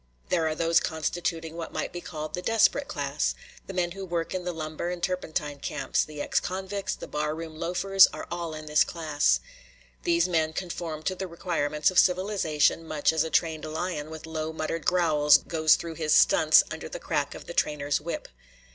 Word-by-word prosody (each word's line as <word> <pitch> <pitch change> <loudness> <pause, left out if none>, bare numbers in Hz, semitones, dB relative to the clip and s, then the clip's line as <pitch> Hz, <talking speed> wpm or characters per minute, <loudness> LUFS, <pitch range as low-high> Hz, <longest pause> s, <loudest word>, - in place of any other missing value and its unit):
There 160 - +2
are 155 - -1
those 165 +1 +3
constituting 165 0 -3
what 170 -1 -6
might - - -3
be 175 - -5
called 155 -2 -6
the 180 - -3
desperate 225 +7 +3
class - - -1 0.3
the 195 - -6
men 175 -1 0
who 195 +2 -7
work 170 -2 -3
in 185 -1 -3
the 180 - -1
lumber 160 +1 -4
and 175 -1 -5
turpentine 155 -6 -2
camps, 140 -1 -1
the 150 -1 -6
ex - - +1
convicts, 190 +2 -3
the - - -8
bar 150 +1 -2
room 160 -1 -7
loafers 185 +3 +5
are - - -7
all 170 -2 -4
in 155 0 -8
this 150 0 +4
class. 155 -3 +1 0.6
These 340 -1 +2
men 160 -3 +1
conform 165 -3 -5
to 190 - 0
the 190 +1 -5
requirements 165 -1 0
of 185 - +5
civilization 180 -5 +2
much 155 +1 +1
as 160 -1 +2
a 160 - -3
trained 160 -1 0
lion 155 -1 -3
with 160 0 -8
low 160 0 -3
muttered 160 0 -3
growls 155 -5 +5
goes 160 -2 +3
through 170 -1 -6
his 155 -1 +1
stunts 155 0 +6
under - - -6
the - - -5
crack - - -2
of - - -10
the - - -7
trainer's 145 -1 0
whip. 170 +2 -5
165 Hz, 195 wpm, -27 LUFS, 155-180 Hz, 0.6 s, stunts